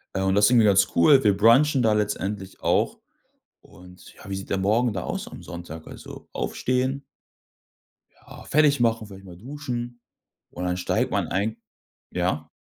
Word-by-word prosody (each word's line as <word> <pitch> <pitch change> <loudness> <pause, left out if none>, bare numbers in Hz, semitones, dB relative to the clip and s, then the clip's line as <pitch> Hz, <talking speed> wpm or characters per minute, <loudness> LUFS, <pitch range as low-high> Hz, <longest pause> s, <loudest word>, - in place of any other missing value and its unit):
Ja 95 - 0
und 95 - +2
das 105 +1 +4
ist 105 - +4
irgendwie 120 -3 +5
ganz 95 -2 +4
cool, 135 - +6
wir 100 -3 +4
brunchen 130 +6 +4
da 110 -1 +3
letztendlich 105 -2 -3
auch. - - +1 0.6
Und 90 0 -16
ja, - - -14
wie 95 - -3
sieht 95 - -7
der - - 0
Morgen 110 +5 +1
da 90 - -4
aus - - -4
am - - -11
Sonntag? 85 -2 -9
Also, - - -11
aufstehen 130 +2 -2 1.1
ja, - - -14
fertig 145 -2 +3
machen, 115 -2 +1
vielleicht 100 -1 -13
mal 90 -2 -12
duschen 120 -1 -6 0.5
und 90 - -6
dann 90 0 -1
steigt 90 - -1
man - - 0
eigen 105 +3 -2 0.5
ja` 90 -3 -2
105 Hz, 170 wpm, -24 LUFS, 95-120 Hz, 1.1 s, cool